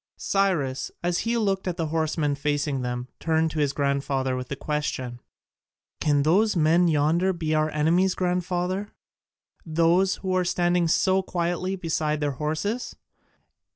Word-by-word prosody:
Cyrus, 175 Hz, -10 st, 0 dB
as 175 Hz, 0 st, +1 dB
he 235 Hz, +1 st, 0 dB
looked 195 Hz, -4 st, 0 dB
at 180 Hz, -, -2 dB
the 160 Hz, -2 st, -2 dB
horsemen 155 Hz, -2 st, 0 dB
facing 145 Hz, -1 st, -1 dB
them, 125 Hz, 0 st, -3 dB
turned 160 Hz, 0 st, +1 dB
to 155 Hz, -, -3 dB
his 145 Hz, -2 st, +2 dB
grandfather 140 Hz, -2 st, -1 dB
with 125 Hz, 0 st, -5 dB
the -, -, -4 dB
question, 130 Hz, -4 st, -3 dB, 0.8 s
"Can 145 Hz, -2 st, +2 dB
those 200 Hz, +8 st, +3 dB
men 170 Hz, +2 st, +4 dB
yonder 165 Hz, +4 st, +2 dB
be 160 Hz, -3 st, -2 dB
our 155 Hz, 0 st, +2 dB
enemies, 170 Hz, +5 st, +2 dB
grandfather, 180 Hz, +2 st, -1 dB, 0.7 s
those 170 Hz, +4 st, +2 dB
who 185 Hz, -1 st, -2 dB
are 185 Hz, -, +2 dB
standing 175 Hz, -1 st, +1 dB
so 190 Hz, +4 st, +3 dB
quietly 180 Hz, +1 st, -2 dB
beside 160 Hz, -4 st, -1 dB
their 145 Hz, -1 st, 0 dB
horses?" 155 Hz, -, -3 dB
160 Hz, 145 wpm, -25 LUFS, 150-180 Hz, 0.8 s, men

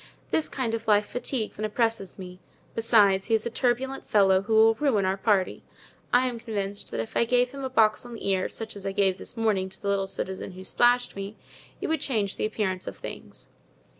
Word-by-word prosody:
This 315 Hz, -, +1 dB
kind 250 Hz, -4 st, -2 dB
of 230 Hz, -, -3 dB
life 210 Hz, -1 st, +4 dB
fatigues 245 Hz, -2 st, -4 dB
and 215 Hz, -, -1 dB
oppresses 225 Hz, -3 st, -1 dB
me; 180 Hz, -1 st, -9 dB, 0.3 s
besides, 205 Hz, -4 st, +4 dB
he 225 Hz, -, +3 dB
is 220 Hz, -, -1 dB
a 235 Hz, -, -2 dB
turbulent 255 Hz, +3 st, -1 dB
fellow, 195 Hz, -2 st, +4 dB
who 220 Hz, +3 st, 0 dB
will 220 Hz, +1 st, +7 dB
ruin 225 Hz, -7 st, +1 dB
our 190 Hz, +1 st, +1 dB
party. 195 Hz, -1 st, +1 dB, 0.5 s
I 250 Hz, +1 st, +4 dB
am 240 Hz, -2 st, -4 dB
convinced 205 Hz, -3 st, -4 dB
that -, -, -4 dB
if 115 Hz, -, -5 dB
I -, -, +4 dB
gave 245 Hz, +1 st, +2 dB
him 275 Hz, 0 st, -7 dB
a 265 Hz, -, -2 dB
box 220 Hz, -4 st, +3 dB
on 240 Hz, -1 st, -9 dB
the 225 Hz, -, -6 dB
ear, 190 Hz, -1 st, +1 dB
such 225 Hz, -1 st, -6 dB
as 200 Hz, -, -9 dB
I 195 Hz, 0 st, -3 dB
gave 195 Hz, -1 st, +2 dB
this -, -, -6 dB
morning 205 Hz, -4 st, +1 dB
to 190 Hz, -, -13 dB
the 200 Hz, -, -3 dB
little 195 Hz, -1 st, +1 dB
citizen 190 Hz, 0 st, -4 dB
who 185 Hz, +1 st, -9 dB
splashed 245 Hz, +5 st, +2 dB
me, 200 Hz, +2 st, -6 dB, 0.5 s
it -, -, -2 dB
would 320 Hz, 0 st, 0 dB
change 210 Hz, -7 st, 0 dB
the -, -, 0 dB
appearance 190 Hz, -4 st, -2 dB
of 100 Hz, -, -6 dB
things." -, -, -9 dB
215 Hz, 225 wpm, -26 LUFS, 195-235 Hz, 0.5 s, will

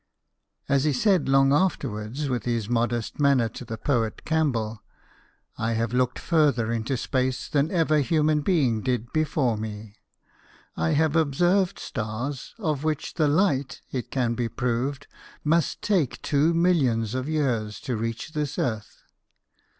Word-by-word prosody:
As 140 Hz, -1 st, +2 dB
he 150 Hz, -1 st, +2 dB
said 185 Hz, -, +2 dB
long 135 Hz, 0 st, +5 dB
afterwards 135 Hz, -, -1 dB
with 125 Hz, -5 st, -2 dB
his 115 Hz, -4 st, -1 dB
modest 120 Hz, +1 st, -1 dB
manner 140 Hz, -5 st, +4 dB
to 115 Hz, -, -9 dB
the 115 Hz, -2 st, -6 dB
poet 115 Hz, -4 st, -1 dB
Campbell, 120 Hz, -10 st, 0 dB, 0.4 s
" -, -, -33 dB, 0.3 s
I 115 Hz, +1 st, 0 dB
have 115 Hz, +1 st, -1 dB
looked 125 Hz, 0 st, +1 dB
further 145 Hz, -9 st, +2 dB
into 115 Hz, +3 st, -1 dB
space 130 Hz, 0 st, -1 dB
than 145 Hz, +1 st, +1 dB
ever 160 Hz, -4 st, +2 dB
human 150 Hz, +1 st, +2 dB
being 140 Hz, -, +2 dB
did 125 Hz, -2 st, -2 dB
before 150 Hz, -7 st, +1 dB
me. 105 Hz, -1 st, -7 dB, 0.8 s
I 80 Hz, 0 st, 0 dB
have 160 Hz, +1 st, +2 dB
observed 175 Hz, +5 st, +2 dB
stars 120 Hz, +4 st, -5 dB
of 150 Hz, -3 st, -2 dB
which 155 Hz, -2 st, -2 dB
the 155 Hz, -, +2 dB
light, 145 Hz, -4 st, +1 dB
it 125 Hz, -2 st, -4 dB
can 125 Hz, -3 st, 0 dB
be 115 Hz, 0 st, -2 dB
proved, 130 Hz, +4 st, -2 dB, 0.4 s
must 160 Hz, +1 st, +1 dB
take 180 Hz, -, +1 dB
two 150 Hz, +2 st, +2 dB
millions 140 Hz, -, +2 dB
of 130 Hz, +3 st, -3 dB
years 115 Hz, -9 st, -1 dB
to 125 Hz, -, -3 dB
reach 115 Hz, +6 st, -4 dB
this 150 Hz, -3 st, -3 dB
earth." 110 Hz, -4 st, -3 dB
130 Hz, 150 wpm, -25 LUFS, 115-150 Hz, 0.8 s, long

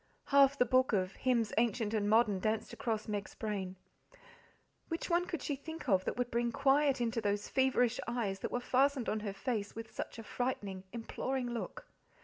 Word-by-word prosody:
Half 280 Hz, 0 st, +6 dB
the 250 Hz, -, +4 dB
book 255 Hz, 0 st, +3 dB
of 185 Hz, -2 st, +1 dB
"Hymns 235 Hz, -5 st, +1 dB
Ancient 230 Hz, -2 st, +1 dB
and 205 Hz, -2 st, +1 dB
Modern" 215 Hz, -3 st, +4 dB
danced 215 Hz, +2 st, -1 dB
across 220 Hz, -2 st, -2 dB
Meg's 205 Hz, -2 st, -4 dB
brain. 195 Hz, -4 st, -3 dB, 1.1 s
Which 330 Hz, +2 st, -3 dB
one 350 Hz, +1 st, +2 dB
could 335 Hz, -6 st, -4 dB
she 290 Hz, -, -1 dB
think 320 Hz, +3 st, -8 dB
of 190 Hz, -4 st, +3 dB
that -, -, -2 dB
would 245 Hz, -1 st, -1 dB
bring 235 Hz, 0 st, +1 dB
quiet 275 Hz, +1 st, +3 dB
into 230 Hz, -1 st, 0 dB
those 205 Hz, -1 st, 0 dB
feverish 260 Hz, -2 st, +2 dB
eyes 225 Hz, -5 st, -1 dB
that -, -, -4 dB
were 245 Hz, -, 0 dB
fastened 265 Hz, 0 st, +2 dB
on 215 Hz, -, 0 dB
her 210 Hz, -1 st, -3 dB
face 205 Hz, 0 st, -3 dB
with 225 Hz, 0 st, -7 dB
such -, -, -5 dB
a 225 Hz, -, -7 dB
frightening, 205 Hz, -6 st, -3 dB
imploring 245 Hz, +2 st, -3 dB
look? 235 Hz, -, -5 dB
235 Hz, 185 wpm, -34 LUFS, 210-260 Hz, 1.1 s, Half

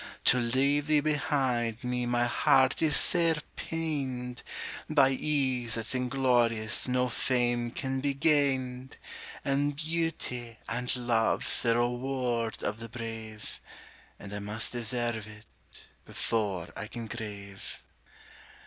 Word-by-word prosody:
To 125 Hz, -, +7 dB
leave 135 Hz, +5 st, +2 dB
thee 155 Hz, -1 st, +4 dB
behind 135 Hz, -6 st, 0 dB
me 125 Hz, 0 st, -1 dB
my 120 Hz, 0 st, +2 dB
heart 130 Hz, +1 st, +3 dB
is 155 Hz, -2 st, +3 dB
sair 165 Hz, -2 st, +3 dB, 0.2 s
pained; 135 Hz, -7 st, -3 dB, 0.5 s
By 135 Hz, 0 st, +5 dB
ease 130 Hz, -4 st, 0 dB
that's 115 Hz, +2 st, -2 dB
inglorious 125 Hz, -4 st, +2 dB
no 125 Hz, 0 st, +2 dB
fame 120 Hz, -1 st, 0 dB
can 130 Hz, +2 st, -3 dB
be 140 Hz, 0 st, 0 dB
gained; 135 Hz, -3 st, +1 dB, 0.5 s
And 140 Hz, +1 st, +1 dB
beauty 155 Hz, -7 st, -2 dB
and 125 Hz, +2 st, -1 dB
love's 120 Hz, -2 st, +3 dB
the 115 Hz, -1 st, +3 dB
reward 120 Hz, -2 st, -1 dB
of 105 Hz, -, -2 dB
the 115 Hz, 0 st, -8 dB
brave, 115 Hz, -2 st, -7 dB, 0.6 s
And 100 Hz, 0 st, -9 dB
I 105 Hz, -, -3 dB
must 105 Hz, +2 st, +2 dB
deserve 120 Hz, -2 st, -2 dB
it 105 Hz, 0 st, -14 dB, 0.2 s
before 100 Hz, -7 st, -2 dB
I 105 Hz, -, -5 dB
can 115 Hz, 0 st, -7 dB
crave. 100 Hz, -4 st, -8 dB
125 Hz, 120 wpm, -29 LUFS, 115-135 Hz, 0.6 s, To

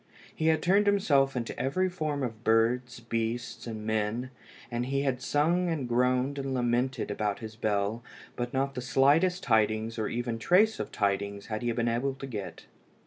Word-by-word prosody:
He 160 Hz, -, -1 dB
had 160 Hz, -1 st, +3 dB
turned 200 Hz, +3 st, +4 dB
himself 140 Hz, -10 st, +3 dB
into 120 Hz, -2 st, -3 dB
every 140 Hz, +9 st, +1 dB
form 155 Hz, -6 st, -2 dB
of 115 Hz, -2 st, -5 dB
birds, 120 Hz, +2 st, +2 dB
beasts, 115 Hz, +1 st, -3 dB
and 110 Hz, -2 st, -6 dB
men, 110 Hz, +4 st, -1 dB, 0.4 s
and 120 Hz, +1 st, -2 dB
he 135 Hz, +1 st, 0 dB
had 130 Hz, -2 st, -1 dB
sung 170 Hz, +7 st, +1 dB
and 150 Hz, -6 st, -2 dB
groaned 125 Hz, +3 st, +1 dB
and 135 Hz, -1 st, -2 dB
lamented 120 Hz, -1 st, 0 dB
about 105 Hz, -1 st, -1 dB
his 110 Hz, -1 st, -8 dB
bell, 105 Hz, +1 st, -1 dB, 0.3 s
but 120 Hz, 0 st, -3 dB
not 135 Hz, +1 st, 0 dB
the 125 Hz, -, -4 dB
slightest 155 Hz, +9 st, +3 dB
tidings 110 Hz, -1 st, +1 dB
or 110 Hz, -, -1 dB, 0.3 s
trace 200 Hz, -, +3 dB
of -, -, -4 dB
tidings 100 Hz, 0 st, -1 dB
had 110 Hz, -, -2 dB
he 120 Hz, -1 st, 0 dB
been 115 Hz, 0 st, 0 dB
able 125 Hz, +4 st, 0 dB
to 135 Hz, -, -7 dB
get. 100 Hz, -10 st, -7 dB
125 Hz, 175 wpm, -29 LUFS, 110-140 Hz, 0.4 s, turned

